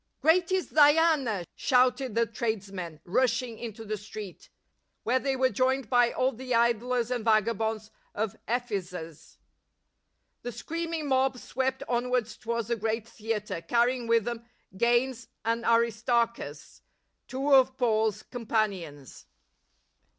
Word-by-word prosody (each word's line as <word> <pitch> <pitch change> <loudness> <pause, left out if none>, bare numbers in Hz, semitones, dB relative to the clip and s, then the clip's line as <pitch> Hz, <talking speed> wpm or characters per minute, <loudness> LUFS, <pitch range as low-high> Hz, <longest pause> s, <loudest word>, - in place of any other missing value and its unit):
" - - -50
Great 345 +3 +4
is 375 -1 0
Diana 295 - +4
!" - - -51
shouted 250 -2 +2
the 230 0 +3
tradesmen, 200 -7 -4
rushing 230 +3 0
into 225 -1 -7
the 215 0 -3
street, 205 -2 -9 0.6
\vhere 255 +3 +2
they 270 -1 0
were 260 0 +2
joined 260 -2 0
by 245 -1 +4
aU 255 +1 +1
the 255 0 -3
idlers 235 +1 +1
and 245 -3 -1
vagabonds 220 0 +1 0.2
of 215 -1 -2
Ephesus. 185 - -4 1.0
The 245 - -5
screaming 330 +6 -4
mob 265 -1 +2
swept 265 +1 -2
onwards 245 -2 0
towards 235 -1 -3
the 235 - +2
great 225 +1 -2
theatre, 210 -6 -4
carrying 240 +6 +1
with 230 -1 +3
them 235 0 -4 0.3
Gains 240 +3 +1 0.2
and 230 +1 0
Aristarchus, 230 - 0 0.5
two 275 +2 0
of 260 -1 +5
Paul's 220 -4 +1
companions. 200 - -3
235 Hz, 130 wpm, -28 LUFS, 215-255 Hz, 1.0 s, of